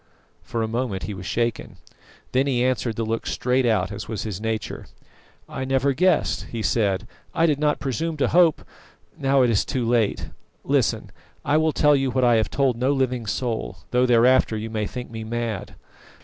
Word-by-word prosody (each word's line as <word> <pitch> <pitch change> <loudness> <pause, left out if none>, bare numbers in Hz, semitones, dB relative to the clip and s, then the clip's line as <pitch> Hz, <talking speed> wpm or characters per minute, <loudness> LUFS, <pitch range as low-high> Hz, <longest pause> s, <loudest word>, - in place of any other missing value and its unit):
For 115 -1 -3
a - - -1
moment 115 -4 -2
he 105 - -4
was 90 -2 -7
shaken. 115 -2 -2 0.5
Then 130 +2 +2
he 125 -2 +1
answered 125 -3 0
the 115 - -2
look 115 +1 -3
straight 125 0 +1
out, 105 -4 +1
as 100 - -6
was 110 -3 -4
his 105 -3 -5
nature. 110 -2 -4 0.6
"I 130 - -5
never 135 +1 +1
guessed," 180 +3 +1
he 115 -2 -5
said. 100 -2 +1 0.3
"I 165 - +3
did 150 -4 +1
not 150 -1 +1
presume 155 +4 -2
to 140 - +1
hope 170 -3 +4 0.5
now 135 -1 +2
it 120 - +3
is 105 - +2
too 125 -3 -2
late! 115 -3 +1 0.3
Listen! - - 0 0.3
I 145 - +3
will 155 0 +2
tell 150 -1 +4
you 135 -1 +1
what 130 +1 0
I 120 -2 +5
have 110 - 0
told 135 -4 +1
no 130 +3 +1
living 125 -4 -1
soul, 115 +2 -3
though 125 +1 +3
thereafter 120 -1 +4
you 110 +1 -5
may 105 -2 -2
think 125 0 -7
me 110 -1 -6
mad. 115 -2 -4
120 Hz, 190 wpm, -23 LUFS, 110-135 Hz, 0.6 s, I